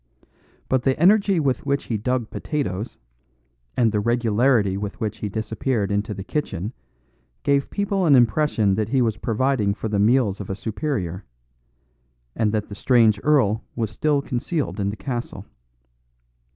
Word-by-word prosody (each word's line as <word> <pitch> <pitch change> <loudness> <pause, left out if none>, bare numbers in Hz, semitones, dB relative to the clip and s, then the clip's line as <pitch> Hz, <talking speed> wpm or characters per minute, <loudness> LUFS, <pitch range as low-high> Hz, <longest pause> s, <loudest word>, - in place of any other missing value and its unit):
But 130 -1 +1
the 135 +2 0
energy 195 +1 +4
with 135 -4 0
which 140 0 0
he 115 - -3
dug 125 +1 -1
potatoes, 120 - -3 0.8
and 115 -3 +3
the 105 - 0
regularity 115 -2 +2
with 100 0 -5
which 110 -2 -3
he 105 - -3
disappeared 110 0 -2
into 100 +1 -1
the 95 - -6
kitchen 110 - -3 0.7
gave 140 -1 +1
people 200 -3 0
an 145 - +6
impression 120 -4 +3
that 110 +2 -1
he 135 +2 +2
was 110 -3 0
providing 115 -3 0
for 110 - -4
the 105 -1 0
meals 105 -2 +2
of 100 - -8
a 95 - -2
superior, 105 - -3 1.1
and 110 -2 +1
that 105 -1 -1
the - - -9
strange 110 -2 +3
earl 120 -8 +3
was 115 -3 -2
still 145 +1 +1
concealed 135 +1 -2
in 100 0 0
the 100 - -4
castle. 120 -2 -5
115 Hz, 155 wpm, -23 LUFS, 105-135 Hz, 1.1 s, an